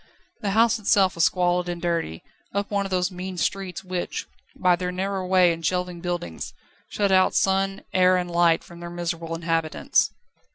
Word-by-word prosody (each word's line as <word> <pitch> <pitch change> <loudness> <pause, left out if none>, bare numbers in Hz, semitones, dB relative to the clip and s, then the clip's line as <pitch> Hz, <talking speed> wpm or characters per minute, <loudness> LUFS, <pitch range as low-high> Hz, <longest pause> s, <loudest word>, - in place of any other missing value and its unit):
The 205 - -1
house 230 0 +4
itself 195 -3 +3
was 170 - +3
squalid 180 -1 +1
and 175 0 -3
dirty, 165 - -2 0.3
up 200 +1 -1
one 200 -1 0
of - - -11
those 185 0 0
mean 185 0 -6
streets 195 +1 -2
which, 180 -1 -3 0.3
by 180 -1 +3
their 180 +1 -3
narrow 190 +1 -2
way 180 -2 +5
and 165 0 -8
shelving 180 +1 -1
buildings, 175 - -4 0.3
shut 200 -2 0
out 185 0 +4
sun, 195 0 +1
air, 185 0 +5
and 180 -1 -3
light 170 -1 +3
from 170 0 -13
their 170 0 -7
miserable 170 -1 -4
inhabitants. 165 -1 +1
180 Hz, 175 wpm, -24 LUFS, 170-190 Hz, 0.3 s, way